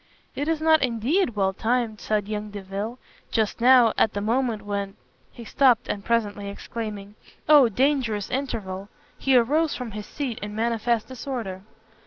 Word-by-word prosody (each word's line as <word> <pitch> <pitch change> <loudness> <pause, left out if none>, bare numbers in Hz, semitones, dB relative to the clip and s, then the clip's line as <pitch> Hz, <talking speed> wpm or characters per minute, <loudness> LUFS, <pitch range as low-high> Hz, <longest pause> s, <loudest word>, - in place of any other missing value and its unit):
"It 285 - -2
is 325 -1 +1
not, 315 0 +5
indeed, 250 - +1
well 195 -1 +1
timed," 230 0 -1
said 210 -2 -1
young 210 0 -4
Delvile, 205 +3 -5 0.3
"just 220 0 -1
now, 245 -2 +6
at 220 - +3
the 205 - -2
moment 225 0 0
when 200 -1 -3 0.2
" - - -37
he 235 - -11
stopt, 250 -1 +3
and 200 - -3
presently 205 -3 -1
exclaiming 205 -1 -6 0.3
"Oh 290 -5 +7
dangerous 240 -4 0
interval!" 205 -8 -4 0.3
he 265 -2 +4
arose 295 +6 +2
from 250 -3 -6
his 210 0 -7
seat 255 -6 -4
in 205 -1 -6
manifest 230 0 0
disorder. 245 -8 -5
225 Hz, 160 wpm, -25 LUFS, 205-255 Hz, 0.3 s, Oh